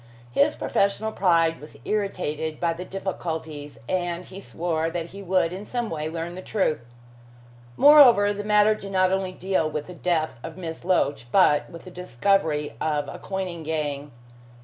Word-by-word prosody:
His 290 - +3
professional 200 +2 0
pride 165 -5 +2
was 150 - -12
irritated 160 -7 -2
by 170 -1 +1
the 175 +2 -7
difficulties, 160 -6 -5
and 175 -1 -2
he 190 - -10
swore 165 -4 -2
that 170 0 -4
he 200 - -9
would 185 -2 +1
in 190 +2 -6
some 240 +1 -3
way 155 -1 -3
learn 165 +1 -5
the 185 - -7
truth. 190 -7 0 1.0
Moreover, 250 -9 +7
the 205 0 -5
matter 210 0 +4
did 200 -2 -8
not 185 0 +3
only 190 -1 0
deal 185 -3 -1
with 150 -1 -4
the 180 - -10
death 160 -7 -1
of 160 +3 -8
Miss 165 -3 -6
Loach, 145 -8 +1
but 150 -6 +4
with 170 - -11
the 185 - -11
discovery 165 -3 0
of 150 -2 0
a - - -8
coining 185 -3 -4
gang. 150 -2 -3
175 Hz, 170 wpm, -25 LUFS, 160-195 Hz, 1.0 s, Moreover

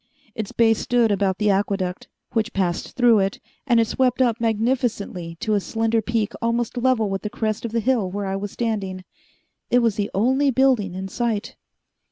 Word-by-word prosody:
Its 215 -2 -5
base 225 -1 +3
stood 240 -3 +2
about 195 -1 +1
the 210 0 +2
aqueduct, 195 -2 -1 0.2
which 230 0 -1
passed 180 -3 -1
through 240 -4 +5
it, 195 0 -1 0.3
and 240 -2 +4
it 225 - +4
swept 250 +2 +1
up 235 -3 +2
magnificently 220 -7 -1
to 215 - -1
a 205 - +3
slender 225 +4 0
peak 220 -1 -1
almost 230 +1 -1
level 245 -3 +2
with 195 -1 -3
the 210 - -4
crest 215 +1 -2
of 230 - -4
the 230 - 0
hill 225 -4 +1
where 200 +2 -4
I 190 0 -2
was 200 +1 -4
standing. 195 -5 -3 0.7
It 245 - +4
was 225 -2 +1
the 205 -1 -1
only 260 +7 +3
building 255 -8 +2
in 190 +1 -4
sight. 225 0 -2
220 Hz, 190 wpm, -22 LUFS, 195-235 Hz, 0.7 s, through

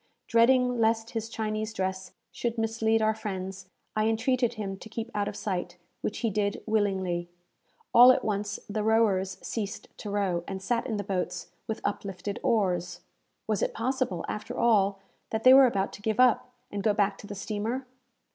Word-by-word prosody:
Dreading 250 +1 +4
lest 225 0 +1
his 225 -1 -3
Chinese 215 -1 -3
dress 190 -2 -3 0.2
should 235 -1 -3
mislead 225 0 +1
our 215 0 +3
friends, 190 -3 -6 0.3
I 215 0 +2
entreated 240 +1 +1
him 200 -3 -4
to 220 - -11
keep 230 +1 -5
out 205 -1 0
of - - -4
sight; 180 -4 -3 0.2
which 210 - -3
he 225 - +1
did, 200 0 -1
willingly. 190 -5 0 0.6
All 245 +2 +10
at - - +1
once 205 -1 -2
the 210 +1 -2
rowers 210 -4 +2
ceased 205 -3 -4
to 210 - -6
row, 195 -4 0
and 190 -1 -4
sat 235 +6 -1
in 220 -4 -2
the 205 - -2
boats 190 -2 -3 0.2
with 220 - -3
uplifted 200 0 -3
oars. 180 -5 0 0.4
Was 215 -3 0
it - - -1
possible, 250 -5 -1
after 210 - -5
all, 200 -4 +3 0.3
that 220 0 -2
they 255 - +9
were 270 -1 +9
about 200 -4 -1
to - - -10
give 215 +1 -1
up, 250 -1 +4 0.2
and 205 - -3
go 210 0 +2
back 200 -1 +1
to 205 - -10
the 205 - -6
steamer? 220 +6 -3
215 Hz, 180 wpm, -28 LUFS, 195-225 Hz, 0.6 s, All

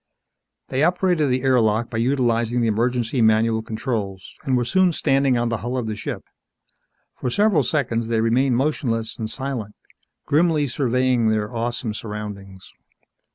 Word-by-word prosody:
They 130 - -1
operated 175 -3 +2
the 125 +1 0
air 130 -2 +4
lock 110 +1 0
by 115 - -2
utilizing 120 -2 +1
the 115 - +2
emergency 120 +2 0
manual 110 0 +3
controls, 110 -4 -4
and 130 -4 +1
were 120 - 0
soon 185 +6 +3
standing 135 -3 +2
on 120 0 0
the 115 - -1
hull 120 +4 -4
of 125 - -2
the 110 -1 -3
ship. 105 - -5 0.9
For 125 - -4
several 205 - +3
seconds 115 -6 -1
they 115 -1 0
remained 120 +3 +2
motionless 120 -5 -1
and 110 -1 -3
silent, 125 -5 -4 0.5
grimly 155 0 +2
surveying 125 -3 +1
their 110 +1 -1
awesome 115 -1 -2
surroundings. 105 -3 -8
120 Hz, 155 wpm, -22 LUFS, 110-135 Hz, 0.9 s, air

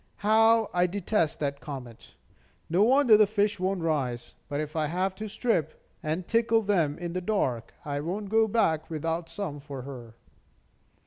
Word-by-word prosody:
How 225 +1 +4
I 180 0 +3
detest 185 -3 -1
that 140 -1 -2
comet! 130 -6 -9 0.6
No 180 +3 +3
wonder 250 0 +6
the 215 -1 +5
fish 205 -1 0
won't 185 0 -1
rise. 135 -7 -2 0.2
But 145 0 -2
if 155 0 -4
I 155 -1 +1
have 185 +4 -1
to 215 0 -5
strip, 185 - -1 0.2
and 160 +3 -3
tickle 230 -1 +2
them 170 -8 +1
in 175 -1 -5
the 185 - -2
dark, 155 - -1
I 145 -1 -2
won't 190 +7 -4
go 220 +1 +3
back 200 -8 +1
without 165 +1 -3
some 165 -4 -5
for 140 -3 -8
her." 120 -4 -9
175 Hz, 170 wpm, -27 LUFS, 150-210 Hz, 0.6 s, wonder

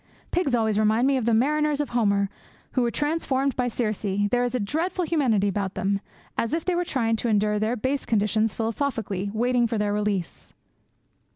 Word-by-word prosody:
Pigs 300 -8 +1
always 220 -2 +1
remind 215 +3 +3
me 275 0 +3
of 255 -4 -1
the 235 - +2
mariners 300 +4 +2
of 295 - -1
Homer, 200 -4 +2 0.4
who 255 - +1
were 240 - +2
transformed 280 -1 0
by 250 -1 0
Circe; 220 -3 -2 0.3
there 245 0 +2
is 245 0 -1
a - - +1
dreadful 330 - -1
humanity 250 - +2
about 195 -1 -2
them, 195 +1 0 0.4
as 230 +7 0
if 330 - -3
they 365 - +1
were 350 0 +1
trying 230 -9 0
to 240 - -2
endure 210 0 +2
their 220 +3 0
base 260 +4 -1
conditions 215 0 +1
philosophically, 225 -4 -2
waiting 240 +2 +2
for 225 - -2
their 205 -1 0
release.' 205 -4 -3
230 Hz, 190 wpm, -25 LUFS, 210-275 Hz, 0.4 s, remind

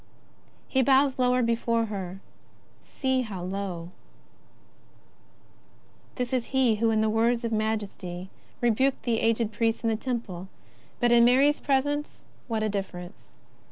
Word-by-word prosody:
" - - -34 0.2
He 265 - +2
bows 270 0 +3
lower 250 0 +3
before 230 0 +1
her 195 -3 -6 0.3
— - - -33
see 260 -1 +1
how 200 -7 -5
low! 180 -2 -4 2.2
This 250 0 -3
is 250 -2 +1
he 255 -5 +2
who 225 +1 +2
in 220 0 +2
words 230 +2 +1
of 230 - -2
majesty 205 -4 -3 0.3
rebuked 250 +3 +2
the 230 -2 +1
aged 225 -1 +1
priest 225 +2 0
of 225 - +2
the - - +1
Temple. 215 -7 -4 0.5
But 240 -1 +3
in 235 0 +6
Mary's 270 +5 +4
presence, 290 +2 -1 0.2
what 225 -3 -1
a - - +1
difference 195 -3 -6
230 Hz, 140 wpm, -27 LUFS, 205-250 Hz, 2.2 s, in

